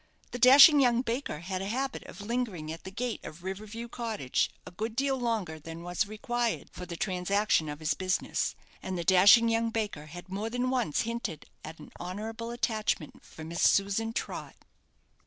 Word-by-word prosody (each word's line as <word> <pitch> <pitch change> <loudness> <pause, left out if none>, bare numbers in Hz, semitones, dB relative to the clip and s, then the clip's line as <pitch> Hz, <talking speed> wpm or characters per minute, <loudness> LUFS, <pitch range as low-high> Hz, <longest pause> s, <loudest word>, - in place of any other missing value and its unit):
The 245 - -5
dashing 275 +4 +9
young 245 -2 +3
baker 235 - -3
had 185 +1 -4
a 195 - -3
habit 265 +5 -2
of - - -10
lingering 205 -8 -3
at 165 - -9
the - - -5
gate 235 +4 -4
of 155 +3 -10
River 190 +3 -5
View 230 +3 -6
Cottage 225 - -1 0.2
a - - -9
good 220 +5 -4
deal 270 +1 +1
longer 220 -10 -2
than 165 +2 -9
was 175 +4 -1
required 235 +2 -2
for 180 - -8
the 170 - -6
transaction 185 -2 +1
of 150 0 -6
his 155 -1 0
business; 185 0 -1 0.3
and 190 -1 -4
the 170 - -2
dashing 200 +6 +7
young 230 0 +1
baker 210 -9 -3
had 175 +4 -10
more 200 +4 -3
than 245 +2 -1
once 245 - +1
hinted 230 -9 -4 0.2
at 160 +1 -8
an 150 - -13
honourable 220 +6 -5
attachment 220 - -2
for 160 - -11
Miss 165 +2 -4
Susan 200 +3 +3
Trott. - - -5
210 Hz, 185 wpm, -29 LUFS, 175-235 Hz, 0.3 s, dashing